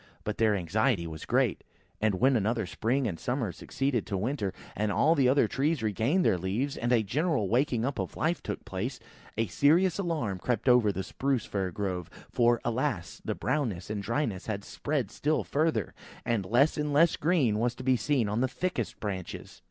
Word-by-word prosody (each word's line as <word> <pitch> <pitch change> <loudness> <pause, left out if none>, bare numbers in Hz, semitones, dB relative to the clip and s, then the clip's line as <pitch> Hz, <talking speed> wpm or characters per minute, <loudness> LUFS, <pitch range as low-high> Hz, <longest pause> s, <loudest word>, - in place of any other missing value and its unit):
But 105 - -4
their 110 -2 +4
anxiety 100 +2 +1
was 80 -1 -7
great, - - +1 0.4
and 110 -2 +2
when 130 +7 +3
another 110 0 +1
spring 125 +8 0
and 90 -8 -3
summer 125 - -1
succeeded 135 - -2
to 105 - -2
the - - 0
winter, 105 -1 -1 0.2
and 105 +1 0
all 155 +9 +4
the 135 -6 +3
other 140 +2 +4
trees 145 -1 0
regained 115 - +1
their 90 - +3
leaves, 110 +11 -1
and 120 +1 -1
a 115 -3 +4
general 140 - 0
waking 120 -1 +1
up 140 0 -2
of - - -4
life 165 +3 0
took - - -5
place, 120 +7 -4 0.4
a 115 - +2
serious 160 - +3
alarm 150 - -1
crept 120 +4 -1
over 125 -4 +5
the 95 0 -4
Spruce 135 +1 -1
fir 95 -2 -2
grove; 90 -2 -3 0.2
for, 120 -1 +3
alas! 120 - -2
the - - -2
brownness 110 - -2
and 105 -1 -2
dryness 115 -3 -2
had 100 -2 -3
spread 140 -6 -2
still 155 +2 0
further, 150 - 0 0.3
and 110 -5 0
less 135 +10 +3
and 150 0 -1
less 165 +3 +5
of - - -5
green 140 -10 +2
was 120 +1 0
to - - -8
be 130 0 +3
seen 125 0 +1
on 105 +3 -1
the 130 - +3
thickest 130 - -3
branches. 95 -4 -6
120 Hz, 200 wpm, -29 LUFS, 105-140 Hz, 0.4 s, over